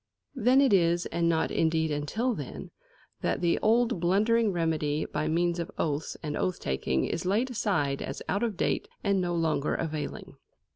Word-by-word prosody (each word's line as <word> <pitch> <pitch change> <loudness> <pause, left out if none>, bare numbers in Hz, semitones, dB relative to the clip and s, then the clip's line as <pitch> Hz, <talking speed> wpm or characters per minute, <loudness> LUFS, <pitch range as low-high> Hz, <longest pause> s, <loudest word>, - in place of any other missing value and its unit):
Then 260 +1 +4
it 270 -6 +4
is, 175 -2 +3
and 170 0 0
not, 160 -1 +1
indeed, 160 -1 +1
until 180 - -1
then, - - -7 0.5
that - - 0
the 170 -1 +2
old 230 -1 +2
blundering 210 +5 +3
remedy 155 -3 0
by 155 - -2
means 170 +2 +1
of 170 - -3
oaths 150 -1 -2
and 150 -1 -3
oath 185 - -1
taking 65 0 -1
is 165 - -3
laid 215 +8 +1
aside 185 - 0
as 135 - -5
out 200 - 0
of 225 -5 -1
date - - 0 0.2
and 200 -2 +2
no 175 -1 -1
longer 160 -3 0
availing. 155 -3 -5
170 Hz, 175 wpm, -28 LUFS, 155-210 Hz, 0.5 s, Then